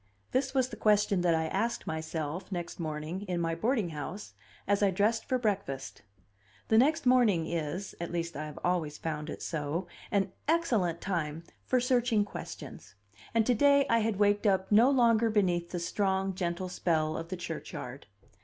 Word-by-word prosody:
This 265 +1 0
was 260 -1 +2
the - - -7
question 210 -3 +3
that 170 -2 +3
I 160 0 0
asked 235 +8 -1
myself, 160 +2 -4
next 175 -1 -5
morning, 155 +3 -4
in 180 -1 -1
my 165 -1 0
boarding 215 +2 0
house, 160 +6 -6 0.3
as 200 0 +2
I 200 - +5
dressed 210 +5 +1
for 255 - +1
breakfast; 185 - -2 0.7
the 220 - +5
next 300 +4 +3
morning 235 -10 +4
is 170 +4 -3
at 170 - -4
least 170 0 -3
I 155 +2 -4
have 150 - -10
always 170 -4 0
found 155 -1 -4
it - - -6
so 160 +3 -2 0.2
an 195 -2 +1 0.2
excellent 230 - +1
time 165 -4 -2 0.2
for 255 - +3
searching 245 -4 +2
questions; 200 - -9 0.4
and 225 -1 +4
to 250 - +3
day 280 +3 +5
I 230 - +5
had 220 -2 0
waked 205 +1 +3
up 190 0 +1
no 225 +5 +7
longer 235 -4 +4
beneath 180 -5 +1
the 180 - -4
strong, 190 +2 0
gentle 180 0 -2
spell 160 -3 0
of 165 - -4
the 185 - -4
churchyard. 150 -7 -7
185 Hz, 175 wpm, -30 LUFS, 165-220 Hz, 0.7 s, no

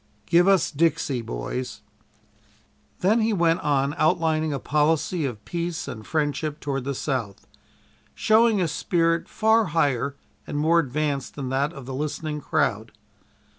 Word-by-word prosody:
"GIVE 175 +2 +4
US 195 -4 +3
'DIXIE,' 145 -4 +1
BOYS!" 115 - -5 1.2
Then 215 +5 +3
he 220 0 +1
went 170 -3 +2
on 140 -1 +1
outlining 160 -1 +2
a 140 - -1
policy 155 +3 +1
of 110 -6 -5
peace 170 -1 -3
and 110 -1 -8
friendship 150 -1 -1
toward 135 -3 -3
the 140 0 -2
South 125 -8 -3 0.7
showing 220 -1 +4
a 180 - +1
spirit 165 0 0
far 220 0 +3
higher 140 -2 +1 0.3
and - - -4
more 160 +3 +4
advanced 145 -1 -2
than 135 -3 -4
that 140 +3 0
of 140 -6 -10
the 135 - -6
listening 150 +2 -3
crowd. - - -1
150 Hz, 140 wpm, -24 LUFS, 135-170 Hz, 1.2 s, GIVE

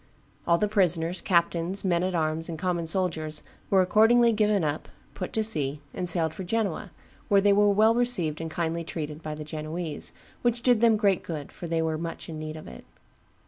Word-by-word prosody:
All 170 - +4
the 210 - +1
prisoners, 180 -4 +1
captains, 170 +2 0
men 175 -2 +2
at 185 0 -1
arms, 160 0 -1
and 165 - -4
common 175 -1 -2
soldiers 160 -4 -2 0.3
were 190 -1 +4
accordingly 230 +5 +4
given 210 -3 +2
up, 150 0 -2 0.3
put 185 - -5
to 220 - +1
sea, 150 -9 +1
and 180 - -2
sailed 165 -2 +1
for 190 - -6
Genoa, 200 -2 -2 0.4
where 200 - +4
they 200 0 +4
were 205 +1 +4
well 215 +3 +4
received 225 -11 +1
and 165 - -4
kindly 165 +1 -2
treated 155 -1 -6
by 155 -2 -5
the 155 - -7
Genoese, 155 +1 -5 0.3
which 240 0 0
did 245 -3 +3
them 230 -2 +5
great 200 -3 +2
good, 155 -4 -6
for 175 - -8
they 165 0 0
were 160 -1 -1
much 165 0 -6
in 155 -1 -6
need 155 0 -6
of 155 - -10
it. 60 - -11
170 Hz, 200 wpm, -26 LUFS, 160-205 Hz, 0.4 s, them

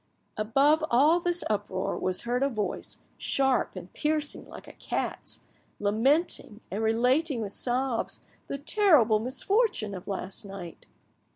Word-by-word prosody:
Above 275 +9 +3
all 295 +8 +5
this 350 0 +1
uproar 205 -2 -2
was 185 0 0
heard 245 +1 -1
a 275 - +2
voice, 210 -7 -3 0.2
sharp 270 -2 +1
and - - -9
piercing 300 -1 -1
like - - -11
a - - -11
cat's, - - -4 0.4
lamenting, 225 - +1
and 200 +3 -2
relating 250 +6 +2
with 210 -3 -4
sobs 250 +1 -1 0.3
the 280 - -3
terrible 285 - +4
misfortune 260 - +1
of 185 -2 -8
last 195 0 -4
night. 195 -4 -9
245 Hz, 130 wpm, -28 LUFS, 210-295 Hz, 0.4 s, all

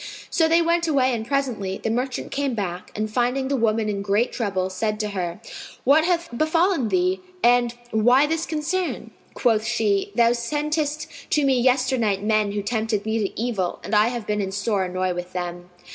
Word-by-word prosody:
So 325 - +3
they 335 +1 +4
went 340 0 +1
away 265 -4 +2
and 225 -1 -3
presently, 240 -9 -1
the 225 - -2
merchant 250 +2 -2
came 275 -3 -1
back 185 -4 -4
and 215 +1 -1
finding 250 +4 0
the 280 - +1
woman 225 -3 +1
in 200 -1 -2
great 205 +4 +1
trouble, 190 -5 -1
said 210 +3 -2
to 210 - -2
her, 180 -3 -4 0.4
"What 300 +5 +5
hath 340 -7 -1
befallen 315 - +2
thee 370 +1 +1 0.2
and 240 0 +4 0.2
why 245 +6 +4
this 325 +2 -1
concern?" 335 +4 -2 0.2
Quoth 225 -4 +2
she, 215 -4 0
"Thou 235 0 +5
sentest 295 +5 -1 0.2
to 295 -2 +2
me 265 -2 +3
yesternight 250 -6 +2
men 215 -1 +1
who 205 -1 -2
tempted 220 -1 -1
me 220 +1 0
to 200 -1 -3
evil, 220 -7 -2
and 200 - -6
I 210 +1 +5
have 240 -2 -4
been 210 0 -1
in 190 -1 -3
sore 200 -1 0
annoy 185 0 -1
with 180 0 -6
them." 175 0 -5
230 Hz, 190 wpm, -23 LUFS, 205-275 Hz, 0.4 s, What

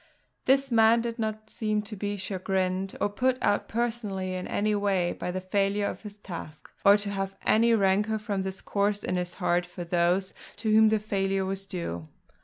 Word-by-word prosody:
This 270 0 +3
man 225 0 +5
did 230 0 -4
not 215 0 -3
seem 215 -1 -1
to 215 +1 -7
be 205 +1 -3
chagrined, 190 0 -1
or - - +2
put 255 +5 +1
out 205 - +1
personally 220 -5 -2
in 185 0 -4
any 210 +1 0
way, 195 -4 +1
by - - -5
the 185 +1 -2
failure 200 +2 +1
of - - -4
his 210 -1 -9
task, 170 -6 -9
or 200 +1 +7
to 205 -1 -4
have 195 -1 -3
any 230 +1 +4
rancour, 205 +2 +2
from 205 -2 -2
this 190 0 -4
cause, 205 0 0
in 180 - -1
his 180 -1 -3
heart 175 -1 +1
for 175 0 -7
those 175 +2 +1 0.2
to 215 +1 -1
whom 220 0 +7
the 220 - +3
failure 195 -2 -1
was 195 +1 -4
due. 85 - -5
200 Hz, 195 wpm, -28 LUFS, 190-215 Hz, 0.2 s, or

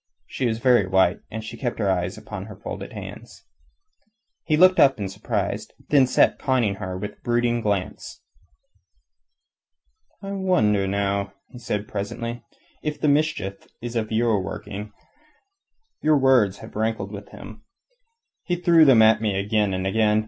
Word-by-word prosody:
She 130 - -2
was 110 -1 -1
very 120 -4 +3
white, 95 -1 +3
and 110 0 -6
she 110 +2 -7
kept 120 -1 -3
her 100 - -1
eyes 90 0 -1
upon 105 -2 -7
her 105 - -10
folded - - -7
hands. - - -10 1.0
He 155 -2 +2
looked 185 +2 +6
up 135 -1 +5
in 100 - -2
surprise, 95 - -3
and - - -26
then 140 -3 +5
sat - - +3
conning 120 -8 +1
her 95 -1 -5
with 105 +2 -7
brooding 120 0 +1
glance. 100 -4 -3 2.0
"I 195 - -5
wonder, 115 - +1
now," 100 0 -1 0.2
he 125 - -11
said 105 -3 -3
presently, 115 +4 -5 0.4
"if 150 -1 -4
the - - 0
mischief 145 -10 0
is 120 0 -6
of 110 -1 -2
your 110 -2 +2
working. 105 +1 -7 1.1
Your 155 -1 +4
words 130 -8 +3
have - - -14
rankled 110 -2 -2
with 100 -1 -9
him. 110 +2 -11 0.8
He 175 - -2
threw 170 -2 +5
them 125 -6 +7
at 110 0 +5
me 105 -3 0
again 105 0 +1
and 95 0 -2
again. 105 +1 +2
110 Hz, 155 wpm, -23 LUFS, 100-125 Hz, 2.0 s, them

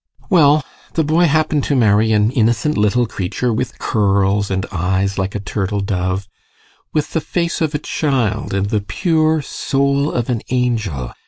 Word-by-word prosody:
GUSTAV. - - -27
Well, 150 -5 +5 0.3
the 160 - +2
boy 160 +4 +3
happened 155 -2 +1
to 145 - 0
marry 110 -2 +3
an 105 +1 +3
innocent 120 +3 +1
little 105 +4 +2
creature 110 +4 -2
with 125 +3 -3
curls, 100 -1 +1
and 95 0 -1
eyes 95 +2 -1
like 95 +2 -2
a - - -1
turtle 100 0 -2
dove; 95 -1 -2 0.6
with 155 -1 -2
the 160 - 0
face 170 +2 -2
of 155 -2 0
a - - +3
child 130 -8 -1
and 100 +1 -1
the 105 -2 +1
pure 155 - +1
soul 140 +2 0
of 120 -1 -2
an 120 -4 -1
angel. 110 - -1
115 Hz, 170 wpm, -18 LUFS, 100-145 Hz, 0.6 s, Well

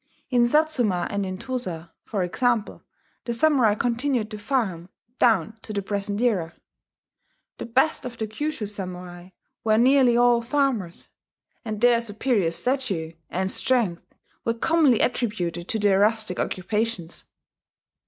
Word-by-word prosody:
In 240 -1 +4
Satsuma 240 - +2
and 200 -1 -2
in 185 0 -5
Tosa, 185 -10 -4
for 200 -4 -2
example, 230 +4 -1 0.4
the 235 - -1
samurai 255 -6 +3
continued 240 -1 -1
to 215 - -6
farm 205 -8 -2 0.3
down 220 -1 +2
to 215 - -7
the 200 -1 -2
present 200 +1 -3
era: 185 -9 0 1.0
the - - -5
best 265 +7 +1
of 245 -2 -7
the 220 - -2
Kyushu 250 +3 -3
samurai 180 -3 -8 0.3
were 215 -1 +3
nearly 250 0 +5
all 240 -1 +4
farmers; 235 - -1 0.5
and 215 -3 -4
their 240 -1 +5
superior 215 -4 0
stature 195 -6 -2 0.2
and 190 +1 -2
strength 230 -10 0 0.4
were 230 - 0
commonly 290 -2 +3
attributed 180 -8 -1
to 225 - 0
their 205 -2 +3
rustic 215 -2 +2
occupations. 200 -2 -2
220 Hz, 135 wpm, -24 LUFS, 190-245 Hz, 1.0 s, nearly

